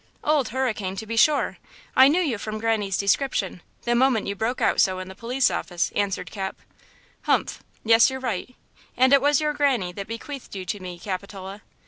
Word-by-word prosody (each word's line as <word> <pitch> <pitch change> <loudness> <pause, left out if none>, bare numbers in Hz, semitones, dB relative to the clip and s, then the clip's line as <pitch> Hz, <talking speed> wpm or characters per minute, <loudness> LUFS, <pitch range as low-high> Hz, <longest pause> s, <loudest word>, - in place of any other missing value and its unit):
"Old 295 -5 +2
Hurricane, 215 -6 -2
to 220 - -6
be 230 +1 -4
sure. 290 +6 +3 0.4
I 260 +1 +8
knew 325 +6 +3
you 265 - -1
from 215 +1 -4
Granny's 215 -4 0
description, 200 -3 0 0.2
the 240 - +1
moment 245 -2 +3
you 200 - -2
broke 225 +5 -2
out - - +3
so 185 -1 +2
in 185 0 -6
the - - -8
police 250 +6 0
office," 175 -1 -2
answered 195 -3 -1
Cap. 190 -2 -4 0.7
"Humph! - - +1 0.2
Yes, 230 +3 +6
you're 265 0 -5
right; 250 -1 -4 0.4
and 260 +2 +5
it 280 - +7
was 290 0 +3
your 300 -1 0
Granny 265 -11 +1
that 200 +1 -6
bequeathed 235 +2 -7
you 190 -1 -5
to 205 +1 -3
me, 180 -2 -7
Capitola." 195 +1 -6
225 Hz, 190 wpm, -24 LUFS, 195-260 Hz, 0.7 s, I